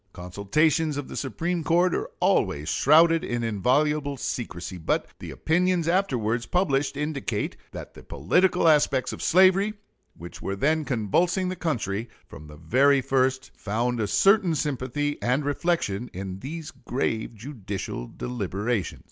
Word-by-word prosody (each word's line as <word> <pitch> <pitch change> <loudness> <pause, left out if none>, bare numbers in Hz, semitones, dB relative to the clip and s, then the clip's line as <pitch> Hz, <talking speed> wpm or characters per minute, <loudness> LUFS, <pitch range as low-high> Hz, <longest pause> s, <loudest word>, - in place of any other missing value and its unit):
Consultations 140 - 0
of 145 - -5
the - - -7
Supreme 165 - -2
Court 175 +2 +2
are - - -2
always 75 +2 +1
shrouded 165 +3 +4
in 120 -1 -2
inviolable 140 +7 +1
secrecy, 95 -7 -5
but 80 - 0
the - - -8
opinions 175 0 0
afterwards 125 - 0
published 140 -6 0
indicate 140 -8 -3 0.2
that - - -9
the - - -13
political 180 - +1
aspects 145 -4 +3
of - - -8
slavery, 190 +4 +4 0.4
which 85 +2 -10
were 100 - -3
then 155 +8 +1
convulsing 170 - 0
the 185 - -3
country, 115 - -2 0.2
from 75 +2 -12
the 75 0 -12
very 135 - +3
first 130 0 0
found 120 +4 -2
a 105 - 0
certain 185 - +3
sympathy 145 0 -2
and 130 +4 0
reflection 145 - -1
in 95 0 -6
these 155 +6 -7
grave 120 -3 -3
judicial 105 - -6
deliberations. 105 - -3
135 Hz, 140 wpm, -25 LUFS, 105-160 Hz, 0.4 s, shrouded